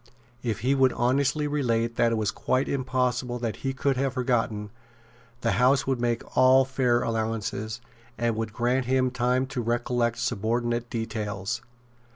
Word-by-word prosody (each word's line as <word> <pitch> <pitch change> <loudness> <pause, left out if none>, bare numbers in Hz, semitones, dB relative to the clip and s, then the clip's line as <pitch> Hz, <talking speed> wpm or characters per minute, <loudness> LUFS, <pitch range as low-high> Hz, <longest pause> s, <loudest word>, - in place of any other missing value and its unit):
If 115 -5 -2
he 130 +4 +2
would 135 -2 +3
honestly 135 +4 +1
relate 115 -5 0
what 115 - +4
it - - +1
was 110 -2 0
quite 130 +1 0
impossible 125 -2 -1
that 115 -2 -3
he 135 - -2
could 135 0 0
have 135 -1 -1
forgotten, 115 -5 0 0.7
the - - +1
House 130 +2 +4
would 130 -3 -1
make 120 -1 -2
all 130 +1 +6
fair 125 -2 +1
allowances, 110 0 -2 0.4
and 115 -1 0
would 110 -1 -3
grant 125 +3 0
him 130 0 +2
time 125 +1 +1
to 135 -2 -4
recollect 120 0 0
subordinate 120 +3 -1
details. 110 -1 -3
120 Hz, 155 wpm, -26 LUFS, 115-130 Hz, 0.7 s, all